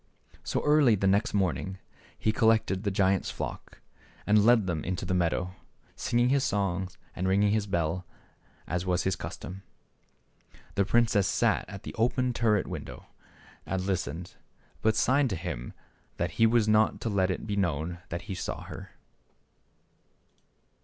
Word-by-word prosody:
So -, -, -2 dB
early 150 Hz, -6 st, +5 dB
the 95 Hz, -, -1 dB
next 100 Hz, +5 st, +3 dB
morning 95 Hz, -1 st, -1 dB, 0.4 s
he 110 Hz, -, +1 dB
col 110 Hz, +1 st, +3 dB
lected 105 Hz, -4 st, +2 dB
the 100 Hz, -, 0 dB
giant's 95 Hz, -1 st, +1 dB
flock -, -, -6 dB, 0.4 s
and 105 Hz, 0 st, +4 dB
led 115 Hz, -2 st, +5 dB
them 85 Hz, -4 st, -2 dB
into 90 Hz, +1 st, -3 dB
the 90 Hz, -, -1 dB
meadow, 90 Hz, +1 st, 0 dB, 0.4 s
singing 120 Hz, +1 st, +1 dB
his 135 Hz, 0 st, +3 dB
songs 95 Hz, -2 st, -1 dB, 0.2 s
and 90 Hz, -, -1 dB
ringing 100 Hz, +2 st, +3 dB
his 105 Hz, -1 st, 0 dB
bell 85 Hz, 0 st, -1 dB, 0.6 s
as 85 Hz, +1 st, -2 dB
was 90 Hz, -1 st, 0 dB
his 95 Hz, -1 st, +1 dB
custom. 90 Hz, +2 st, -7 dB, 1.1 s
The 100 Hz, -, +2 dB
princess 110 Hz, -1 st, +3 dB
sat -, -, +1 dB
at 100 Hz, +1 st, -8 dB
the -, -, -7 dB
open 125 Hz, +2 st, +1 dB
turret 110 Hz, -4 st, +2 dB
window -, -, -7 dB, 0.6 s
and 95 Hz, -, -2 dB
listened, 90 Hz, -2 st, -3 dB, 0.4 s
but 110 Hz, 0 st, +2 dB
signed 130 Hz, +4 st, +3 dB
to 95 Hz, -, -2 dB
him 80 Hz, -8 st, -5 dB, 0.5 s
that 85 Hz, -1 st, -1 dB
he 115 Hz, +5 st, +4 dB
was 115 Hz, -1 st, +3 dB
not 110 Hz, 0 st, +3 dB
to 115 Hz, -, -1 dB
let 95 Hz, -3 st, +1 dB
it 95 Hz, -, -3 dB
be 105 Hz, -2 st, -2 dB
known 85 Hz, -2 st, -1 dB
that 85 Hz, +1 st, -4 dB
he 100 Hz, -, -5 dB
saw 90 Hz, -, -4 dB
her. -, -, -10 dB
95 Hz, 160 wpm, -28 LUFS, 90-110 Hz, 1.1 s, early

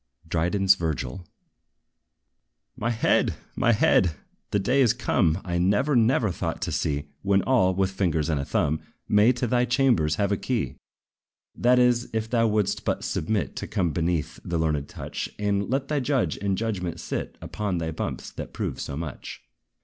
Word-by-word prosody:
DRYDEN'S 90 Hz, +4 st, +3 dB
VIRGIL. 80 Hz, -2 st, -4 dB, 1.5 s
My 120 Hz, -, -2 dB
head! 115 Hz, -1 st, +2 dB, 0.2 s
my 120 Hz, -, +3 dB
head! 90 Hz, -6 st, +3 dB, 0.3 s
the -, -, +1 dB
day 125 Hz, +8 st, +2 dB
is 120 Hz, -4 st, +5 dB
come 90 Hz, -7 st, +1 dB
I 85 Hz, -1 st, -1 dB
never, 100 Hz, +11 st, +2 dB
never 115 Hz, -2 st, +3 dB
thought -, -, -3 dB
to -, -, -2 dB
see; 75 Hz, 0 st, -1 dB
When 100 Hz, -1 st, +2 dB
all, 105 Hz, -8 st, +3 dB
with 95 Hz, 0 st, +1 dB
fingers 85 Hz, -6 st, 0 dB
and 80 Hz, -4 st, 0 dB
a -, -, -4 dB
thumb, 75 Hz, +3 st, 0 dB, 0.3 s
May 105 Hz, +3 st, +5 dB
to 125 Hz, 0 st, -2 dB
thy 125 Hz, +1 st, +2 dB
chambers 120 Hz, -, +2 dB
have 100 Hz, +2 st, 0 dB
a 100 Hz, -, +2 dB
key! 125 Hz, +1 st, -2 dB, 0.8 s
That 125 Hz, +1 st, +4 dB
is, 125 Hz, -1 st, +3 dB
if 110 Hz, 0 st, -1 dB
thou 115 Hz, -1 st, +2 dB
wouldst 105 Hz, -2 st, 0 dB
but -, -, -1 dB
submit 100 Hz, +5 st, -1 dB
To -, -, -4 dB
come 90 Hz, -6 st, 0 dB
beneath 85 Hz, 0 st, -1 dB
the 85 Hz, -, -2 dB
learned 75 Hz, -3 st, 0 dB
touch, -, -, -5 dB
And 100 Hz, -1 st, 0 dB
let 135 Hz, +2 st, 0 dB
the 150 Hz, -1 st, 0 dB
judge 135 Hz, -1 st, +1 dB
in 100 Hz, -1 st, -1 dB
judgment 90 Hz, -6 st, -3 dB
sit -, -, -4 dB
Upon 100 Hz, -4 st, -3 dB
thy 80 Hz, -1 st, -2 dB
bumps, 80 Hz, -, -4 dB
that -, -, -8 dB
prove -, -, -3 dB
so 70 Hz, -, -5 dB
much. 75 Hz, -4 st, -7 dB
100 Hz, 170 wpm, -25 LUFS, 85-120 Hz, 1.5 s, is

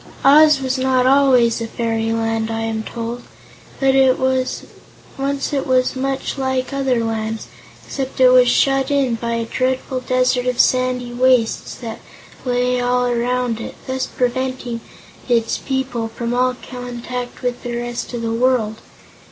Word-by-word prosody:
Oz 300 Hz, +1 st, +7 dB
was 260 Hz, 0 st, -1 dB
not 255 Hz, -1 st, +2 dB
always 255 Hz, -4 st, +4 dB
a 230 Hz, -, -3 dB
fairyland, 225 Hz, -1 st, -1 dB
I 225 Hz, 0 st, -2 dB
am 225 Hz, -1 st, -2 dB
told. 235 Hz, +2 st, -5 dB, 0.6 s
Once 265 Hz, +1 st, 0 dB
it 275 Hz, -, -1 dB
was 255 Hz, +1 st, +1 dB
much 270 Hz, +1 st, -2 dB
like 260 Hz, 0 st, -1 dB
other 265 Hz, -4 st, +1 dB
lands, 220 Hz, 0 st, -3 dB, 0.4 s
except 270 Hz, -1 st, -5 dB
it 255 Hz, -1 st, +7 dB
was 250 Hz, 0 st, +6 dB
shut 270 Hz, +1 st, +2 dB
in 275 Hz, -4 st, +1 dB
by 235 Hz, 0 st, -2 dB
a 230 Hz, 0 st, -2 dB
dreadful 255 Hz, +2 st, -1 dB
desert 255 Hz, 0 st, +1 dB
of 250 Hz, -1 st, -1 dB
sandy 255 Hz, -1 st, +2 dB
wastes 250 Hz, -2 st, +2 dB
that 225 Hz, -3 st, -7 dB, 0.5 s
lay 250 Hz, 0 st, +1 dB
all 250 Hz, 0 st, +1 dB
around 245 Hz, -1 st, 0 dB
it, -, -, -7 dB
thus 260 Hz, 0 st, -2 dB
preventing 250 Hz, -1 st, -2 dB, 0.5 s
its 230 Hz, -2 st, +1 dB
people 265 Hz, -4 st, -2 dB
from 235 Hz, +1 st, -4 dB
all 250 Hz, +1 st, +1 dB
contact 245 Hz, 0 st, -6 dB
with 245 Hz, -1 st, -2 dB
the 240 Hz, -1 st, -4 dB
rest 240 Hz, 0 st, -4 dB
of 235 Hz, -1 st, -4 dB
the 225 Hz, 0 st, -1 dB
world. 230 Hz, -3 st, +1 dB
250 Hz, 145 wpm, -19 LUFS, 235-260 Hz, 0.6 s, Oz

